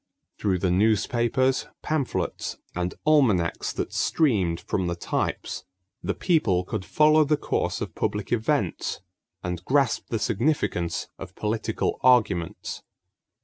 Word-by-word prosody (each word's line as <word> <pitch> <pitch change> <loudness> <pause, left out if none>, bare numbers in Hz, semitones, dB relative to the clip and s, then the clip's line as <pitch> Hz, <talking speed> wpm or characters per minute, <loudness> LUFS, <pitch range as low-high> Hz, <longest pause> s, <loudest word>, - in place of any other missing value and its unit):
Through 95 -3 +1
the 90 0 0
newspapers, 115 +6 +2 0.2
pamphlets, 150 -4 -2 0.2
and 90 0 -2
almanacs 120 - +3
that - - -3
streamed 100 - +2
from 95 -3 -2
the 85 - -1
types, 85 - -2 0.4
the 100 - -2
people 110 - +2
could 100 +1 -4
follow 155 +8 +5
the 150 0 +2
course - - -1
of - - -4
public 105 -1 -2
events 115 - 0 0.4
and 90 -1 -4
grasp 135 +2 +1
the 115 - 0
significance 110 - 0
of - - -9
political 110 0 -1
arguments. 110 -9 +2
110 Hz, 120 wpm, -25 LUFS, 90-135 Hz, 0.4 s, follow